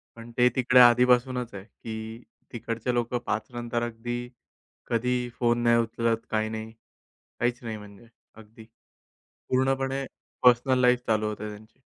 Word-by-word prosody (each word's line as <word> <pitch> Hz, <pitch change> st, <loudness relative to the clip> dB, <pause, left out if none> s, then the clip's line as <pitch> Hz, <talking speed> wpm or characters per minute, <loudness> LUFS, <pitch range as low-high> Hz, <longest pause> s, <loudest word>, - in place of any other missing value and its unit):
पण 115 Hz, 0 st, -11 dB
ते 125 Hz, 0 st, +5 dB
तिकडे 125 Hz, 0 st, +4 dB
आधीपासूनच 125 Hz, 0 st, +4 dB
आहे 95 Hz, -1 st, -8 dB
की 110 Hz, 0 st, -9 dB, 0.6 s
तिकडचे 115 Hz, +1 st, -3 dB
लोकं 120 Hz, 0 st, 0 dB
पाच -, -, -2 dB
नंतर 120 Hz, 0 st, -2 dB
अगदी 120 Hz, +1 st, -4 dB, 0.7 s
कधी 125 Hz, +2 st, +1 dB, 0.2 s
फोन 120 Hz, -1 st, +2 dB
नाही 120 Hz, 0 st, +4 dB
उचलत, 115 Hz, 0 st, 0 dB
काही 110 Hz, 0 st, 0 dB
नाही. 110 Hz, 0 st, -6 dB, 0.7 s
काहीच 120 Hz, 0 st, 0 dB
नाही, 115 Hz, -2 st, -5 dB
म्हणजे 105 Hz, +1 st, -13 dB, 0.3 s
अगदी 110 Hz, 0 st, -14 dB, 0.8 s
पूर्णपणे 135 Hz, +1 st, 0 dB, 0.4 s
पर्सनल 125 Hz, +1 st, +5 dB
लाईफ 125 Hz, 0 st, +4 dB
चालू 110 Hz, -1 st, +1 dB
होते 105 Hz, 0 st, -5 dB
त्यांची. 105 Hz, +3 st, -12 dB
120 Hz, 135 wpm, -27 LUFS, 110-125 Hz, 0.8 s, ते